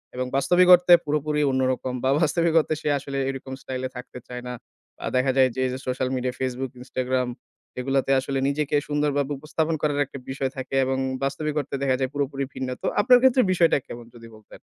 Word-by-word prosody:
এবং 130 Hz, -, -2 dB
বাস্তবিক 175 Hz, +7 st, +4 dB
অর্থে 175 Hz, 0 st, +4 dB
পুরোপুরি 150 Hz, 0 st, 0 dB
অন্যরকম, 130 Hz, -1 st, 0 dB
বা 130 Hz, -, +2 dB
বাস্তবিক 165 Hz, +1 st, +1 dB
অর্থে 155 Hz, -, -1 dB
সে 150 Hz, -, -1 dB
আসলে 140 Hz, 0 st, -6 dB
এরকম 135 Hz, 0 st, -6 dB
স্টাইল 130 Hz, -1 st, -5 dB
এ -, -, -13 dB
থাকতে 125 Hz, 0 st, -9 dB
চায় 125 Hz, 0 st, -6 dB
না। -, -, -4 dB, 0.5 s
আ -, -, -2 dB
দেখা 130 Hz, +1 st, +3 dB
যায় 130 Hz, -1 st, +5 dB
যে -, -, -4 dB
এই -, -, 0 dB
যে 130 Hz, -, -5 dB
সোশ্যাল 130 Hz, 0 st, -1 dB
মিডিয়া, 125 Hz, 0 st, -2 dB
Facebook, 130 Hz, 0 st, -3 dB
Instagram 130 Hz, 0 st, -1 dB, 0.5 s
এগুলাতে 135 Hz, +1 st, 0 dB
আসলে 135 Hz, +1 st, -2 dB
নিজেকে 150 Hz, +1 st, -1 dB
সুন্দরভাবে 145 Hz, -1 st, 0 dB
উপস্থাপন 160 Hz, +2 st, -1 dB
করার 145 Hz, -1 st, 0 dB
একটা 140 Hz, -, -10 dB
বিষয় 130 Hz, 0 st, -2 dB
থাকে 130 Hz, +1 st, -5 dB
এবং 130 Hz, 0 st, -1 dB, 0.3 s
বাস্তবিক 150 Hz, +2 st, -2 dB
অর্থে 140 Hz, -, -4 dB
দেখা 130 Hz, -2 st, +2 dB
যায় 130 Hz, -1 st, 0 dB
পুরোপুরি 140 Hz, -1 st, -2 dB
ভিন্ন। 130 Hz, -, -4 dB
তো -, -, -2 dB
আপনার 250 Hz, +3 st, +6 dB
ক্ষেত্রে 260 Hz, 0 st, +5 dB
বিষয়টা 170 Hz, -4 st, +4 dB
কেমন? 120 Hz, 0 st, -9 dB
যদি 115 Hz, -1 st, -12 dB
বলতেন। 110 Hz, -1 st, -16 dB
135 Hz, 200 wpm, -24 LUFS, 130-150 Hz, 0.5 s, আপনার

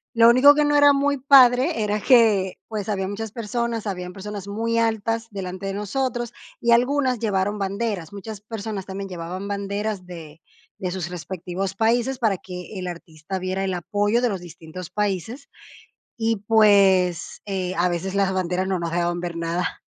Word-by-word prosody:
Lo 230 Hz, 0 st, +7 dB
único 255 Hz, +5 st, +7 dB
que 300 Hz, 0 st, +3 dB
no 295 Hz, -, +2 dB
era 290 Hz, 0 st, +7 dB
muy 280 Hz, 0 st, +1 dB
padre 260 Hz, 0 st, +5 dB
era 210 Hz, 0 st, 0 dB
que, 215 Hz, -7 st, +4 dB
pues, 215 Hz, -2 st, -4 dB
habían 190 Hz, -1 st, -1 dB
muchas 215 Hz, +1 st, -5 dB
personas. 230 Hz, 0 st, -3 dB
Habían 180 Hz, -3 st, -4 dB
personas 200 Hz, 0 st, -7 dB
muy 225 Hz, +3 st, -1 dB
altas 225 Hz, 0 st, 0 dB
delante 190 Hz, -1 st, -5 dB
de 195 Hz, -, -3 dB
nosotros. 240 Hz, +3 st, -2 dB, 0.3 s
Y 235 Hz, 0 st, +1 dB
algunas 255 Hz, +1 st, +3 dB
llevaron 205 Hz, -1 st, 0 dB
banderas, 195 Hz, -3 st, -2 dB
muchas 205 Hz, 0 st, -8 dB
personas 215 Hz, -2 st, -5 dB
también 195 Hz, 0 st, -5 dB
llevaban 180 Hz, +2 st, -6 dB
banderas 200 Hz, 0 st, -3 dB
de 165 Hz, -3 st, -11 dB, 0.4 s
de 180 Hz, -, -2 dB
sus 175 Hz, -2 st, -4 dB
respectivos 180 Hz, +2 st, -5 dB
países 240 Hz, +4 st, +1 dB
para 215 Hz, -6 st, +1 dB
que 180 Hz, +2 st, -8 dB
el 180 Hz, -, -4 dB
artista 170 Hz, +1 st, -7 dB
viera 185 Hz, +1 st, -2 dB
el 190 Hz, -, -1 dB
apoyo 205 Hz, +6 st, 0 dB
de 245 Hz, -, +2 dB
los 195 Hz, -, -3 dB
distintos 175 Hz, +1 st, -10 dB
países 210 Hz, -, -3 dB, 0.7 s
y, 225 Hz, 0 st, +1 dB
pues, 195 Hz, -5 st, +4 dB
eh, 185 Hz, -2 st, -2 dB
a 175 Hz, +1 st, +3 dB
veces 180 Hz, +2 st, -3 dB
las 200 Hz, -1 st, +2 dB
banderas 185 Hz, +1 st, -1 dB
no 190 Hz, -, 0 dB
nos 170 Hz, -1 st, -3 dB
dejaban 175 Hz, 0 st, 0 dB
ver 175 Hz, -1 st, -4 dB
nada. 170 Hz, +2 st, -2 dB
200 Hz, 170 wpm, -23 LUFS, 185-230 Hz, 0.7 s, Lo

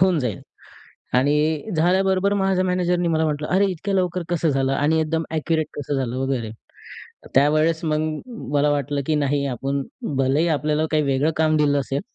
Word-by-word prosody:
होऊन 185 Hz, -2 st, +4 dB
जाईल" 115 Hz, -8 st, -3 dB, 0.8 s
आणि 150 Hz, +7 st, +1 dB
झाल्याबरोबर 190 Hz, +3 st, +2 dB
माझ्या 190 Hz, -1 st, +1 dB
मॅनेजरनी 180 Hz, -1 st, 0 dB
मला 160 Hz, -1 st, +1 dB
म्हटलं 150 Hz, -1 st, -2 dB
"अरे! 190 Hz, +2 st, +3 dB
इतक्या 195 Hz, +3 st, -4 dB
लवकर 180 Hz, -2 st, 0 dB
कसं 170 Hz, -2 st, +1 dB
झालं? 135 Hz, -1 st, +1 dB
आणि 150 Hz, +4 st, +2 dB
एकदम 160 Hz, +1 st, -1 dB
ॲक्युरेट 160 Hz, 0 st, 0 dB
कसं 145 Hz, 0 st, -3 dB
झालं?" 130 Hz, -3 st, -2 dB
वगैरे. 130 Hz, -5 st, -2 dB, 0.8 s
त्यावेळेस 155 Hz, +4 st, +3 dB
मग 155 Hz, -1 st, +1 dB, 0.5 s
मला 145 Hz, +1 st, +3 dB
वाटलं 145 Hz, 0 st, -1 dB
की 160 Hz, -, +2 dB
नाही 145 Hz, -1 st, 0 dB
आपण 135 Hz, +2 st, -2 dB, 0.4 s
भलेही 135 Hz, +5 st, +2 dB
आपल्याला 150 Hz, 0 st, 0 dB
काही 155 Hz, -1 st, +2 dB
वेगळं 140 Hz, +3 st, +1 dB
काम 155 Hz, 0 st, +3 dB
दिलं 145 Hz, -1 st, +2 dB
असेल, 135 Hz, 0 st, -2 dB
155 Hz, 165 wpm, -22 LUFS, 140-170 Hz, 0.8 s, होऊन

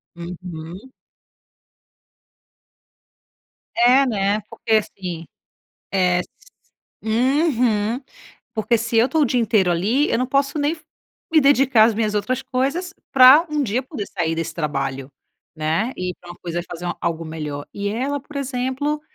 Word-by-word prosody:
Uhum. 175 Hz, +4 st, -8 dB, 2.9 s
É, 250 Hz, +3 st, +5 dB
né. 205 Hz, -2 st, 0 dB
Porque 225 Hz, -, -7 dB
assim, 180 Hz, -6 st, -1 dB, 0.7 s
é 180 Hz, -2 st, +3 dB
s -, -, -8 dB, 0.7 s
uhum. 240 Hz, -2 st, +1 dB, 0.5 s
Porque 225 Hz, +2 st, +1 dB
se 230 Hz, +1 st, -2 dB
eu 235 Hz, +3 st, +4 dB
tô 320 Hz, -, +1 dB
o 295 Hz, -, +5 dB
dia 245 Hz, 0 st, +1 dB
inteiro 210 Hz, -5 st, +2 dB
ali, 215 Hz, -, +1 dB
eu -, -, +1 dB
não 255 Hz, -, 0 dB
posso 275 Hz, +3 st, 0 dB
nem 290 Hz, +1 st, +1 dB
f 310 Hz, -, -19 dB, 0.5 s
me 315 Hz, -, +6 dB
dedicar 270 Hz, -5 st, +5 dB
às 225 Hz, 0 st, +2 dB
minhas 215 Hz, -1 st, -1 dB
outras 210 Hz, +5 st, -1 dB
coisas 275 Hz, +9 st, -2 dB, 0.2 s
pra 270 Hz, +6 st, +8 dB
um 300 Hz, -1 st, 0 dB
dia 240 Hz, +2 st, -1 dB
poder 220 Hz, -5 st, -6 dB
sair 170 Hz, -4 st, -2 dB
desse 165 Hz, 0 st, -4 dB
trabalho, 135 Hz, -4 st, -3 dB, 0.5 s
né, 160 Hz, +10 st, 0 dB
ir 180 Hz, 0 st, -3 dB
pra 175 Hz, -, -13 dB
uma 175 Hz, -, -9 dB
coisa, 175 Hz, 0 st, -3 dB
fazer 175 Hz, +1 st, -5 dB
algo 165 Hz, -1 st, -2 dB
melhor. 150 Hz, -2 st, -6 dB
E 200 Hz, 0 st, -2 dB
ela, 265 Hz, +7 st, -2 dB
por 285 Hz, +2 st, -12 dB
exemplo, 270 Hz, +2 st, -2 dB
220 Hz, 145 wpm, -21 LUFS, 175-265 Hz, 2.9 s, pra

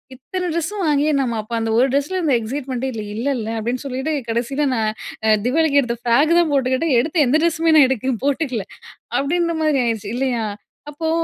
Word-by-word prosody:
இத்தன 360 Hz, +8 st, -4 dB
ட்ரெஸ்ஸும் 380 Hz, +5 st, -2 dB
வாங்கியே 295 Hz, +1 st, +2 dB
நம்ம 235 Hz, -4 st, -1 dB
அப்போ 215 Hz, +3 st, -10 dB
அந்த 225 Hz, 0 st, -1 dB
ஒரு 260 Hz, -, +4 dB
ட்ரெஸ்ல 300 Hz, +7 st, 0 dB
அந்த 290 Hz, -, +2 dB
எக்ஸைட்மெண்ட்டே 260 Hz, +2 st, -4 dB
இல்ல 215 Hz, -, -5 dB
இல்லல்ல. 240 Hz, -3 st, -2 dB
அப்டின்னு 240 Hz, +4 st, -3 dB
சொல்லிட்டு 265 Hz, +4 st, -2 dB, 0.2 s
கடைசியில 250 Hz, +6 st, -1 dB
நான் 220 Hz, -2 st, 0 dB, 0.5 s
தீபாவளிக்கு 285 Hz, +2 st, +3 dB
எடுத்த 235 Hz, -1 st, -3 dB
ஃப்ராக் 285 Hz, +8 st, +3 dB
தான் 335 Hz, -3 st, +2 dB
போட்டுக்கிட்டேன். 265 Hz, +2 st, +1 dB
எடுத்த 310 Hz, +2 st, +1 dB
எந்த 260 Hz, -, +2 dB
ட்ரெஸ்ஸுமே 330 Hz, -1 st, +2 dB
நான் 275 Hz, -4 st, +7 dB
எடுத்து 260 Hz, 0 st, -1 dB
போட்டுக்கல. 275 Hz, -7 st, -1 dB, 0.6 s
அப்டின்ற 335 Hz, +4 st, 0 dB
மாரி 300 Hz, -4 st, +2 dB
ஆயிடுச்சு 215 Hz, -3 st, -2 dB
இல்லையா? 250 Hz, -3 st, 0 dB, 0.5 s
அப்போ 320 Hz, +2 st, -2 dB
270 Hz, 170 wpm, -20 LUFS, 240-310 Hz, 0.6 s, நான்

